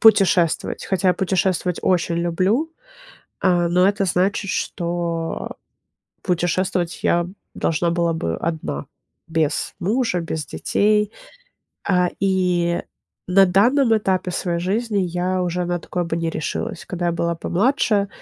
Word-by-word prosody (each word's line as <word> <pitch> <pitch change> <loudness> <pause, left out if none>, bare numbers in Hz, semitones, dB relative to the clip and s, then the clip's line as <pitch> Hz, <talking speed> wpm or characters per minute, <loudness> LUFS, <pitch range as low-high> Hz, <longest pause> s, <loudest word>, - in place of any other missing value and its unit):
путешествовать. 190 -6 +4
Хотя 190 0 +1
я 180 - +4
путешествовать 185 -2 0
очень 170 -2 +1
люблю, 185 - +1 0.7
а, 175 -2 +3
но 180 +2 +4
это 200 0 +1
значит, 190 +3 +1
что 170 -2 -3 0.7
путешествовать 175 0 -1
я 170 0 +2 0.3
должна 170 +1 0
была 170 -1 +1
бы 85 - -2
одна 160 - -3 0.4
без 160 -2 0
мужа, 225 +1 0
без 160 -2 -4
детей. 210 0 +1 0.8
А, 180 -2 +3
и 180 -3 +1 0.5
на 195 +1 +6
данном 230 +6 +4
этапе 190 -3 0
своей 175 -1 -1
жизни 210 +4 0
я 180 0 0
уже 180 0 -1
на 175 0 -1
такое 175 +1 -3
бы 165 - -3
не 165 -1 -1
решилась. 155 - -4
Когда 175 -1 -3
я 170 - +1
была 170 0 -1
помладше 205 - +1
180 Hz, 130 wpm, -21 LUFS, 170-195 Hz, 0.8 s, на